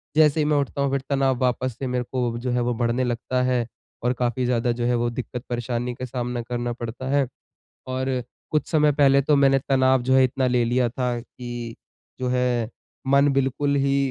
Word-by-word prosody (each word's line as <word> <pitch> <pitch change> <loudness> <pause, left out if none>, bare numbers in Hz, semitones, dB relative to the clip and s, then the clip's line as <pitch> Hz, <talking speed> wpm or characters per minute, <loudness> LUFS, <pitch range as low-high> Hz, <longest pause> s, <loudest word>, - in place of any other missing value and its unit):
जैसे 155 0 +5
ही 150 - +2
मैं 150 -1 +2
उठता 140 0 -1
हूँ 140 -1 +1
फिर 140 -1 0
तनाव 135 -2 +2
वापस 125 -1 0
से 135 - -2
मेरे 125 0 -1
को 120 -2 -1
जो 125 0 -2
है 120 0 +1
वो 120 0 0
बढ़ने 120 +2 0
लगता 125 +1 -1
है 125 -2 +1 0.4
और 125 +1 +2
काफ़ी 125 +1 0
ज़्यादा 120 -1 +1
जो 120 0 -2
है 120 0 +2
वो 120 0 +1
दिक्कत 125 0 -5
परेशानी 120 0 -2
का 130 - -5
सामना 125 -1 -3
करना 120 0 -3
पड़ता 120 +2 -6
है। 140 -2 +2 0.6
और 130 -1 -1 0.3
कुछ 155 - 0
समय 150 -2 +4
पहले 140 -1 +4
तो 145 +1 +3
मैंने 135 -1 +4
तनाव 130 -1 +3
जो 130 +1 +2
है 130 0 +6
इतना 130 +1 0
ले 125 -1 +2
लिया 120 +1 +2
था 125 0 -2
कि 120 -1 -7 0.5
जो 125 - -1
है 125 -2 0 0.4
मन 140 +1 +5
बिल्कुल 135 +1 +1
ही 140 0 +2
125 Hz, 210 wpm, -24 LUFS, 120-135 Hz, 0.6 s, है